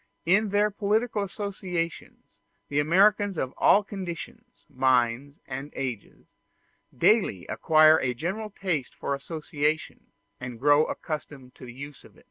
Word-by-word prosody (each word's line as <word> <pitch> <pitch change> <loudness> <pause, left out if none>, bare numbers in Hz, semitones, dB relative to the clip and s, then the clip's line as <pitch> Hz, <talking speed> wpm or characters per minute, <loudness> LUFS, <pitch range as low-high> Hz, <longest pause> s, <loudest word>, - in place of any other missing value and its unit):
In 200 +5 +3
their 205 +1 +2
political 210 +2 0
associations, 190 -4 -5 0.3
the 145 - 0
Americans 195 +5 +3
of 130 -3 -2
all 205 - +5
conditions, 195 +5 -8
minds, 130 0 +1
and 135 +2 -6
ages, 125 -6 -6 0.7
daily - - +2
acquire 155 0 +5
a 125 -2 -1
general 190 - -4
taste 180 -9 -3
for 140 - -3
association, 150 +1 -3 0.3
and 125 -2 -7
grow 145 +3 +4
accustomed 145 -4 -6
to 125 - -12
the 120 - -9
use 140 +2 -10
of - - -18
it. - - -18
155 Hz, 130 wpm, -26 LUFS, 140-200 Hz, 0.7 s, all